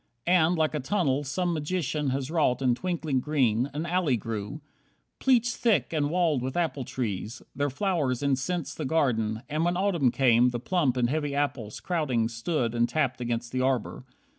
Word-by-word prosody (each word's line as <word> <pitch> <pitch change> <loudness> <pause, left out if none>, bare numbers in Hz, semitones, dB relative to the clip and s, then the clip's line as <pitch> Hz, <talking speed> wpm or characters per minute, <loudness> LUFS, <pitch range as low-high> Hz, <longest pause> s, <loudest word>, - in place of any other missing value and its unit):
And, 175 -1 +4
like 155 -1 +1
a 150 - -1
tunnel 145 -3 0
some 175 +6 -1
magician 150 -2 -1
Has 135 +2 -2
wrought 145 -6 +1
in 125 -2 +4
twinkling 160 -2 -1
green, 130 -3 +1
an 150 +4 -3
alley 170 -7 +1
grew, 110 +4 -5 0.6
Pleached 245 -2 +3
thick 205 - +1
and 145 -2 +1
walled 165 -5 +1
with 130 +5 -3
apple 160 -6 -1
trees; 115 -2 -4
their 145 +1 0
flowers 145 - -1
Incensed 140 +6 -1
the 155 - -2
garden, 115 -7 0
and 155 +2 -1
when 175 +1 +1
Autumn 180 -9 +2
came 125 -1 +4
The 120 -1 -3
plump 140 -2 0
and 120 -1 +2
heavy 145 +1 -1
apples 130 -7 -2
crowding 135 -10 0
stood 120 +1 -1
And 120 0 +1
tapped 140 -5 0
against 120 -1 -3
the 130 - -1
arbour. 130 -2 -1
140 Hz, 175 wpm, -27 LUFS, 125-165 Hz, 0.6 s, And